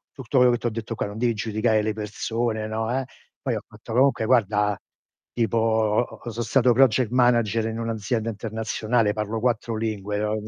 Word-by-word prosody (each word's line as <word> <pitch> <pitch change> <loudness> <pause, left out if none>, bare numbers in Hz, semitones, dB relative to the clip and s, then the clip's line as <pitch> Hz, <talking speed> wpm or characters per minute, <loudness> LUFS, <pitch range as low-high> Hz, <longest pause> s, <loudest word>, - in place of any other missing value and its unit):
tutto 135 -1 -4
quello 125 0 +6
che 120 - 0
ti 120 - -4
ho - - +1
detto 115 +1 -5
qua, - - -2
non 100 +1 -8
devi 120 0 +2
giudicare 110 +1 +1
le 110 - -1
persone" 110 +1 -2
no, 110 +1 -2
eh. 135 - -2 0.4
Poi - - -1
ho - - -4
fatto: - - -11
"Comunque 130 -3 +3
guarda, 105 -4 +2 0.5
tipo 115 -1 0
o 110 -1 +2
o 120 0 -8
sono 115 +1 -3
stato 120 +2 +3
project 130 -1 +4
manager 120 -3 +3
in 115 0 -4
un'azienda 115 0 -2
internazionale, 110 0 -1
parlo 110 +1 -3
4 115 -1 0
lingue." 105 -2 -3
No, 105 0 0
110 Hz, 190 wpm, -24 LUFS, 110-120 Hz, 0.5 s, quello